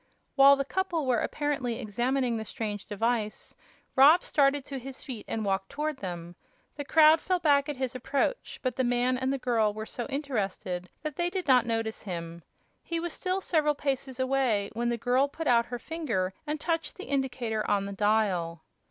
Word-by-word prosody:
While 275 0 +8
the 275 0 -2
couple 345 -2 -1
were 250 -3 +2
apparently 280 -6 -1
examining 245 +2 0
the 220 - -3
strange 210 -2 -5
device, 220 0 -2 0.4
Rob 295 +7 +7
started 280 -1 +2
to 275 -2 -5
his 265 +1 -9
feet 245 -6 -7
and 220 -1 -2
walked 195 0 -1
toward 300 +1 -3
them. 175 -4 -6 0.4
The 290 - -4
crowd 315 +2 +6
fell 365 0 +1
back 290 -4 +3
at 295 - -2
his 260 -1 -2
approach, 275 - -2
but 255 -2 -1
the 260 - +1
man 245 +1 +2
and 260 +1 -1
the 275 - 0
girl 225 -5 +1
were 220 0 -5
so 240 +1 -5
interested 200 -10 -3
that 305 -3 -4
they 345 0 +1
did 370 -2 -4
not 250 -3 +5
notice 225 -1 -2
him. 170 -3 -6 0.4
He 335 -1 -3
was 340 0 -4
still 370 +1 -1
several 305 -5 +2
paces 270 -2 -3
away 260 -6 +1
when 235 +1 -1
the 235 - 0
girl 250 +4 +2
put 320 +3 -6
out 235 -3 +4
her 245 - -4
finger 240 - -2
and 300 +1 -2
touched 330 +1 -2
the 385 - -8
indicator 245 -5 -1
on 200 -1 +2
the 200 - -5
dial. 195 -6 +1
255 Hz, 190 wpm, -28 LUFS, 220-285 Hz, 0.4 s, While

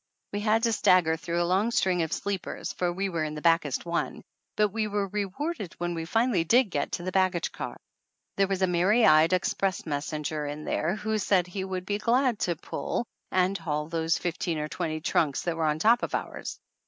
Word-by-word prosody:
We 205 - -1
had 220 +2 +2
to 230 -1 +3
stagger 180 -6 +4
through 170 +2 -1
a - - 0
long 190 +6 +2
string 185 -6 +2
of 160 - -2
sleepers, 200 -3 -3
for 180 -1 0
we 195 +3 -1
were 170 -4 -2
in 155 0 -3
the 150 - -6
backest 165 -5 +2
one, 170 0 -2 0.3
but 210 -1 +3
we 215 +1 -1
were 205 -1 -1
rewarded 210 - -3
when 175 0 -2
we 165 -1 -4
finally 225 -1 +2
did 230 +4 +3
get 145 -3 -2
to 175 - -2
the 185 - -3
baggage 185 -2 +1
car. - - -6 0.6
There 195 0 +3
was 190 -1 -1
a - - +7
merry 185 +6 +3
eyed 155 +2 +6
ex 185 0 +1
press 195 -1 -1
messenger 150 0 -3
in 150 +1 -6
there 170 +5 0
who 215 +1 -1
said 190 -3 +2
he 190 +2 -5
would 185 -1 -4
be 205 +1 -1
glad 245 0 +2
to 175 - 0
pull 235 - -3 0.3
and 185 +1 +2
haul 150 -4 -3
those 165 +1 +1
fifteen 175 -1 -2
or 150 0 -2
twenty 155 -1 -3
trunks 150 -3 +1
that 170 -2 -1
were 160 -1 0
on 150 0 +1
top 230 +9 +4
of - - -2
ours - - -5
180 Hz, 215 wpm, -27 LUFS, 160-205 Hz, 0.6 s, a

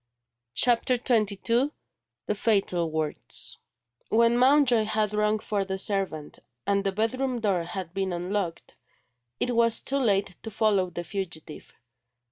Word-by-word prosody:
CHAPTER 245 +1 +3
XXII 230 +1 +1 0.6
THE - - 0
FATAL 195 -6 +1
WORDS 155 -1 -4 0.5
WHEN 230 +1 +4
Mountjoy 250 -3 +4
had 215 -1 0
rung 210 0 +2
for 210 -2 -2
the 190 0 -3
servant, 190 -7 -2 0.3
and 200 0 +1
the 195 - 0
bedroom 245 +5 -1
door 200 -5 +1
had 175 -1 -6
been 195 -1 -1
unlocked, 175 0 -3 0.6
it 245 -1 0
was 230 -1 +3
too 275 +1 +1
late 200 -6 +1
to 225 - -6
follow 205 -4 +1
the 175 0 -5
fugitive. 175 -5 -7
210 Hz, 130 wpm, -27 LUFS, 190-230 Hz, 0.6 s, WHEN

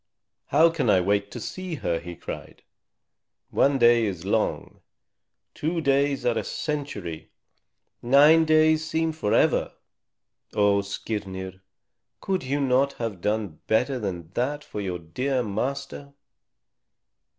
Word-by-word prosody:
"How 160 +4 +5
can 150 -8 -1
I 95 - +5
wait 100 +2 0
to - - -7
see 185 -3 -5
her?" 85 - -2
he 85 +1 -8
cried. - - -9 0.9
"One 140 0 +3
day 120 -2 +5
is 90 -3 -5
long; 110 +2 -1 0.7
two 165 +3 -2
days 140 -1 +1
are 120 -1 +2
a - - -4
century; 140 - -5 0.7
nine 145 +6 +6
days 155 0 +4
seem 160 0 -1
forever. 155 -10 +1 0.8
Oh, 100 -1 +3
Skirnir, 95 -2 -5 0.6
could 190 -1 -1
you 140 +2 -2
not 135 0 +2
have 110 -6 -5
done 105 -6 -2
better 125 +4 +1
than 90 -6 -5
that 145 +4 -1
for 105 - -6
your 95 -3 -3
dear 125 +11 -2
master?" 140 +6 -4
125 Hz, 125 wpm, -25 LUFS, 100-145 Hz, 0.9 s, nine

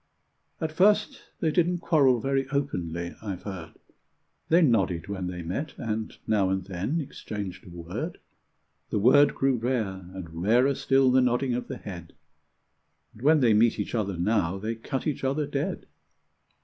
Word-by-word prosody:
At 160 -1 -2
first 205 +6 +3 0.2
they 160 - +2
didn't 175 +2 +2
quarrel 145 -8 +3
very 135 +2 -1
openly, 85 - -2
I've 100 -4 -5
heard; 95 -5 -7 0.8
They 170 +2 +5
nodded 95 - +2
when 95 -2 -4
they 90 -1 -5
met, 130 - -4
and 110 -1 -4
now 100 -4 +2
and 95 -1 -1
then 100 - -2
exchanged 100 - -6
a - - -10
word: 85 0 -5 0.7
The - - -1
word 140 +7 +5
grew 135 -2 +2
rare, 110 -7 -2
and 85 -3 -7
rarer 120 +8 +4
still 135 -1 +3
the 130 +1 +5
nodding 125 +1 +1
of 125 - -3
the 130 - -5
head. 85 -4 -9 1.0
And 110 - -16
when 150 +2 +4
they 115 -4 +5
meet 110 +2 +3
each - - -3
other 100 -5 -1
now, 95 -1 +1
they 110 +4 -3
cut 125 +4 -4
each 150 -3 -2
other 140 +3 0
dead. 140 -1 -3
115 Hz, 160 wpm, -27 LUFS, 95-135 Hz, 1.0 s, They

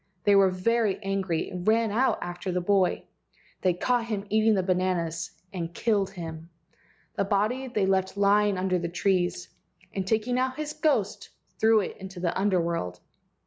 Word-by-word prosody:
They 205 -1 +5
were 195 -1 +6
very 210 +2 +1
angry, 195 -4 -1
and 180 0 -6
ran 225 0 +3
out 250 +5 +2
after 175 +1 -5
the 180 - 0
boy. 190 0 +1 0.6
They 180 -2 +2
caught 240 +5 +1
him 210 -3 -3
eating 220 0 +4
the 190 - +1
bananas, 180 -3 -1 0.2
and 170 -2 -5
killed 205 -4 +1
him. 165 -3 -8 0.7
The - - +2
body 215 +7 0
they 215 -6 0
left 190 0 0
lying 205 0 +3
under 185 -1 0
the 170 0 -3
trees, 175 -1 0 0.5
and 190 -1 -3
taking 225 +4 +1
out 260 0 0
his 305 0 -4
ghost 225 -10 0 0.3
threw 220 0 +5
it - - -5
into 190 -1 -9
the 175 -1 -1
Under 190 -1 +2
world. 165 - -2
195 Hz, 170 wpm, -27 LUFS, 180-215 Hz, 0.7 s, were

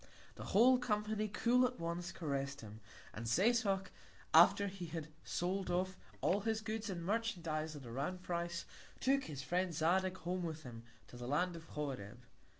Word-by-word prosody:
The - - -8
whole 250 +5 +6
Company, 215 -2 0
cool 235 +4 +3
at 250 0 0
once, 170 +1 -3
caress'd 140 -3 -3
him; 110 -1 -9 0.3
and 115 +2 -5
Setoc, 195 - +2 0.4
after 195 +5 +7
he 190 -3 -5
had 160 -1 -5
sold 185 +2 -1
off 185 +1 0 0.3
all 195 - +3
his 220 +1 -1
Goods 220 0 -3
and 170 -3 -4
Merchandize 170 -8 -1
at 140 -3 -9
a 115 - -8
round 180 +9 -3
Price, 170 -1 -2 0.3
took 270 +1 +2
his 140 -3 -5
Friend 180 +6 0
Zadig 185 +4 +2
Home 180 +2 -2
with 160 -2 -4
him 115 -2 -8 0.3
to 120 - -11
the 120 0 -6
Land 175 +6 +1
of 165 -1 -9
Horeb. 125 -8 -5
175 Hz, 170 wpm, -37 LUFS, 155-205 Hz, 0.4 s, after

